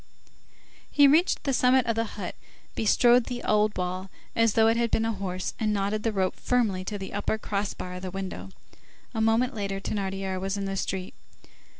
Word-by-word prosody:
He 285 Hz, -1 st, +6 dB
reached 320 Hz, +6 st, +3 dB
the 275 Hz, -, 0 dB
summit 255 Hz, 0 st, +4 dB
of 230 Hz, -2 st, 0 dB
the 225 Hz, 0 st, 0 dB
hut, 190 Hz, -4 st, -4 dB, 0.4 s
bestrode 240 Hz, +2 st, +4 dB
the 245 Hz, -1 st, -5 dB
old 210 Hz, 0 st, +2 dB
wall 185 Hz, +1 st, -3 dB, 0.3 s
as 230 Hz, -2 st, +3 dB
though 225 Hz, -, +4 dB
it 225 Hz, +1 st, +4 dB
had 235 Hz, 0 st, +1 dB
been 225 Hz, -, +1 dB
a 225 Hz, -, +1 dB
horse, 185 Hz, -2 st, -4 dB
and 215 Hz, -1 st, +1 dB
knotted 205 Hz, +1 st, 0 dB
the 225 Hz, -, 0 dB
rope 190 Hz, -3 st, 0 dB
firmly 220 Hz, -7 st, 0 dB
to 205 Hz, +1 st, -3 dB
the 195 Hz, -1 st, -7 dB
upper 205 Hz, +2 st, -1 dB
cross 205 Hz, -1 st, -3 dB
bar 180 Hz, -, -6 dB
of 180 Hz, -, -7 dB
the 185 Hz, -, -4 dB
window. 195 Hz, +1 st, -6 dB, 0.6 s
A 220 Hz, -, -1 dB
moment 225 Hz, +4 st, +2 dB
later, 200 Hz, -3 st, -3 dB
Thénardier 195 Hz, -2 st, -3 dB
was 195 Hz, +1 st, -2 dB
in 200 Hz, -, -2 dB
the 195 Hz, 0 st, -3 dB
street. 190 Hz, -1 st, -3 dB
210 Hz, 200 wpm, -27 LUFS, 195-230 Hz, 0.6 s, He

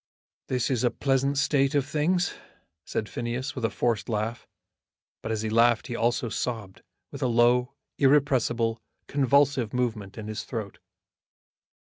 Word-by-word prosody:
"This 125 Hz, 0 st, 0 dB
is 125 Hz, -2 st, 0 dB
a 120 Hz, -, +4 dB
pleasant 135 Hz, +2 st, 0 dB
state 140 Hz, 0 st, +2 dB
of 140 Hz, -2 st, +2 dB
things," 160 Hz, +5 st, +1 dB, 0.5 s
said 110 Hz, -, -3 dB
Phineas, 120 Hz, +5 st, -3 dB
with 130 Hz, -, -6 dB
a 115 Hz, -, +2 dB
forced 110 Hz, +1 st, -1 dB
laugh. 110 Hz, +2 st, -2 dB, 0.7 s
But 110 Hz, -, -4 dB
as 110 Hz, -1 st, -1 dB
he 110 Hz, -, -1 dB
laughed 115 Hz, 0 st, +4 dB
he 120 Hz, -, -5 dB
also 120 Hz, +1 st, +1 dB
sobbed, 110 Hz, -4 st, -4 dB, 0.3 s
with 140 Hz, -, -8 dB
a 130 Hz, -, +2 dB
low, 120 Hz, +1 st, +3 dB, 0.2 s
irrepressible, 125 Hz, -5 st, +2 dB, 0.2 s
convulsive 140 Hz, -3 st, +2 dB
movement 110 Hz, -6 st, -2 dB
in 110 Hz, -1 st, -6 dB
his 110 Hz, 0 st, -4 dB
throat. 110 Hz, -5 st, -6 dB
120 Hz, 145 wpm, -27 LUFS, 115-135 Hz, 0.7 s, a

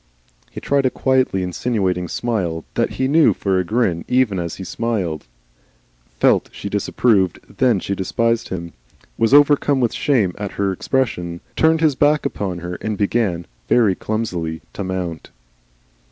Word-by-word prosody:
He -, -, -8 dB
tried 140 Hz, -2 st, +1 dB
a -, -, +2 dB
quietly 130 Hz, -8 st, +1 dB
insinuating 90 Hz, -1 st, -1 dB
smile 90 Hz, -10 st, -2 dB
that -, -, 0 dB
he 130 Hz, -, 0 dB
knew 155 Hz, +3 st, +4 dB
for 95 Hz, -2 st, 0 dB
a -, -, +1 dB
grin 95 Hz, -4 st, 0 dB
even 125 Hz, -7 st, +2 dB
as 85 Hz, -2 st, -4 dB
he 95 Hz, -, -7 dB
smiled 95 Hz, -7 st, -2 dB
it; -, -, -29 dB, 0.9 s
felt -, -, +3 dB
she 100 Hz, -, -6 dB
disapproved 100 Hz, -2 st, +1 dB, 0.2 s
that 120 Hz, -7 st, +3 dB
she 100 Hz, -, -2 dB
despised 115 Hz, +4 st, 0 dB
him, 85 Hz, -2 st, -5 dB, 0.5 s
was 115 Hz, +1 st, +2 dB
overcome 145 Hz, -1 st, +5 dB
with 120 Hz, -3 st, +1 dB
shame 110 Hz, -11 st, +1 dB
at 105 Hz, -2 st, -4 dB
her 100 Hz, -1 st, 0 dB
expression, 90 Hz, -7 st, -2 dB, 0.2 s
turned 160 Hz, 0 st, +3 dB
his 155 Hz, -3 st, +4 dB
back 145 Hz, +2 st, +2 dB
upon 95 Hz, -3 st, -3 dB
her, 90 Hz, 0 st, -5 dB
and 110 Hz, -2 st, -3 dB
began 100 Hz, -5 st, 0 dB, 0.2 s
(very 110 Hz, -6 st, +4 dB
clumsily) 90 Hz, -7 st, -3 dB
to 100 Hz, -, -4 dB
mount. 90 Hz, -3 st, -4 dB
105 Hz, 155 wpm, -20 LUFS, 90-125 Hz, 0.9 s, overcome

